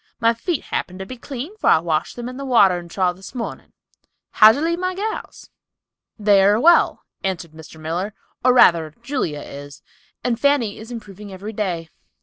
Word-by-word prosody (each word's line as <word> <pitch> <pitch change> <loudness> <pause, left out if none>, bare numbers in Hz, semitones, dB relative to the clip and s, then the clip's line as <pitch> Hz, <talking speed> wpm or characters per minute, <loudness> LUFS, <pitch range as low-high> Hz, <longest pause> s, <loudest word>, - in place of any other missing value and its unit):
My 230 -1 +3
feet 315 +7 -3
happen 185 - -4
to 190 - -6
be 255 - -8
clean, 270 - -7
for - - +1
I - - +7
washed 160 -1 -1
them 240 0 -6
in 250 - -7
the 275 - -5
watering 190 -9 +3
trough 180 0 0
this 190 +6 -12
mornin'. 235 -2 -6 0.6
How 215 0 +8
d'ye 265 - -2
leave 335 +3 0
my 370 0 -2
gals?" 435 +3 -5 0.7
"They 205 -2 +4
are 205 +2 +4
well," 340 +6 +4 0.2
answered 180 -4 -3
Mr. 160 0 -13
Miller, 175 +7 -3 0.3
"or 255 - +5
rather 165 -10 +4
Julia 240 - -2
is, 145 0 -10 0.4
and 240 -2 0
Fanny 270 -6 +1
is 220 +2 -10
improving 210 -3 -9
every 200 +4 -7
day." 175 -6 -3
210 Hz, 180 wpm, -21 LUFS, 175-255 Hz, 0.7 s, How